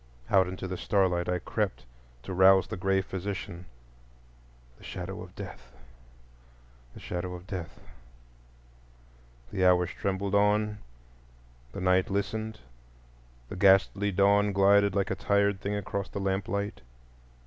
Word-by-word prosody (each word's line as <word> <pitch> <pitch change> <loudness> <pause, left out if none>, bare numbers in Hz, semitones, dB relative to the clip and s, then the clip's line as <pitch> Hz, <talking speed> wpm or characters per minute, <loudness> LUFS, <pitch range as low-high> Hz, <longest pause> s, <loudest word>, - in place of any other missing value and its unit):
Out 95 -2 +5
into 95 +1 -5
the 90 0 -4
starlight 90 -4 +1
I 90 - +1
crept, 95 - -3 0.4
to 95 - -6
rouse 95 +1 +6
the - - -6
gray 95 +1 +1
physician,—the 95 -2 -6 1.1
Shadow - - -6
of - - -12
Death, 65 0 -9 1.2
the - - -10
Shadow 90 0 -5
of 90 0 -11
Death. 90 -4 -7 1.7
The 95 - -1
hours 90 -1 +4
trembled 100 0 -3
on; 105 +1 +2 0.9
the 100 - -7
night 90 0 +2
listened; 110 +2 -3 0.9
the - - -7
ghastly 95 +2 +4
dawn 100 +2 +3
glided 100 +1 +4
like 100 -1 0
a - - 0
tired 100 -1 +1
thing 100 +1 -2
across 100 -1 -4
the 100 - -5
lamplight. 100 +1 -2
95 Hz, 125 wpm, -28 LUFS, 90-100 Hz, 1.7 s, rouse